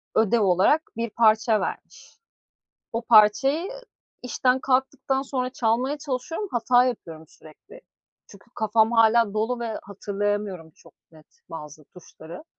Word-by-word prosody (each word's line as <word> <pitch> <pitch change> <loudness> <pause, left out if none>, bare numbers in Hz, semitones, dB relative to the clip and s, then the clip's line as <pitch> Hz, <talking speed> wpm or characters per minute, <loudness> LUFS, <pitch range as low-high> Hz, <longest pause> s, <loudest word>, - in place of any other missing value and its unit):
ödev 225 +1 +2
olarak 195 - +3 0.2
bir 230 0 -2
parça 220 0 +2
vermiş. - - -8 0.7
O 230 +1 -3
parçayı 250 - +4 0.5
işten 250 +1 0
kalktıktan 265 0 0
sonra 255 -2 -3
çalmaya 250 +4 -1
çalışıyorum 295 +8 -4
hata 245 +1 +3
yapıyorum 165 -10 -5
sürekli 160 - -17 0.5
çünkü 200 +4 -18
kafam 220 +1 +1
hâlâ 230 -2 +3
dolu 230 +3 -1
ve 230 -2 -4
hatırlayamıyorum 200 -3 -4
çok - - -22 0.2
net 155 -1 -19 0.2
bazı 150 -1 -10
tuşları. 170 - -13
225 Hz, 120 wpm, -24 LUFS, 205-255 Hz, 0.7 s, parçayı